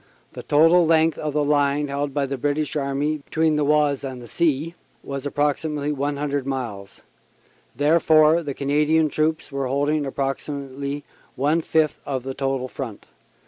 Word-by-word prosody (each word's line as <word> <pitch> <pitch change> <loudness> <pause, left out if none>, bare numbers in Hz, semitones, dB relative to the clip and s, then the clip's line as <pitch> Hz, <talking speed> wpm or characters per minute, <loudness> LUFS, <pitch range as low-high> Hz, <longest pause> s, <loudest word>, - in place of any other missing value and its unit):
The - - -8
total 165 +4 +5
length 160 0 +3
of 150 -1 -3
the 150 0 +1
line 145 0 +2
held 140 +1 -2
by 140 0 0
the 135 0 -3
British 145 +3 -1
Army 145 +2 -1
between 155 +2 0
the 150 - +1
Oise 145 -1 +2
and 130 -2 -5
the 120 - -11
sea 155 +5 0 0.3
was 140 0 -4
approximately 145 +1 -1
100 145 -1 -2
miles; 105 -7 -5 0.7
therefore 155 +1 +4
the 145 -4 -5
Canadian 150 +3 +2
troops 155 +2 -1
were 140 -1 -2
holding 145 +2 0
approximately 140 +1 -4 0.3
one 150 +5 +1
fifth 155 -2 +1
of 130 -3 -3
the 135 0 -4
total 135 -1 -2
front. 125 -5 -7
145 Hz, 150 wpm, -23 LUFS, 135-155 Hz, 0.7 s, total